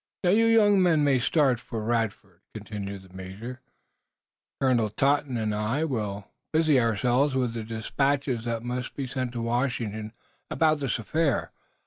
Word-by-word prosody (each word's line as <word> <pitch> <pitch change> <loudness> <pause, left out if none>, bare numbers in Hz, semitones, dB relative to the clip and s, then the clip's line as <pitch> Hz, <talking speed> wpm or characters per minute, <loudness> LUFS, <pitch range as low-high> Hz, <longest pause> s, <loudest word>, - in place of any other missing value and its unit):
"Now, 180 - +4
you 225 +3 +4
young 205 -3 +5
men 165 -5 +4
may 140 -3 +3
start 130 -2 +2
for 115 -2 -5
Radford," 110 -5 -2
continued 100 -2 -6
the 95 -1 -18
major. 105 +8 -8 1.0
"Colonel 125 -5 +2
Totten 140 +2 +1
and 110 -2 -1
I 110 +8 0
will 105 -9 -3 0.3
busy 155 -3 +4
ourselves 125 +5 +2
with 125 -3 0
the 115 -1 -4
despatches 125 +3 -1
that 115 -1 -2
must 125 +1 -4
be 140 - -3
sent 130 -1 -3
to 120 -1 -3
Washington 115 -3 -2 0.4
about 155 -2 +2
this 135 -3 -1
affair. 145 +5 0
120 Hz, 150 wpm, -27 LUFS, 110-140 Hz, 1.0 s, young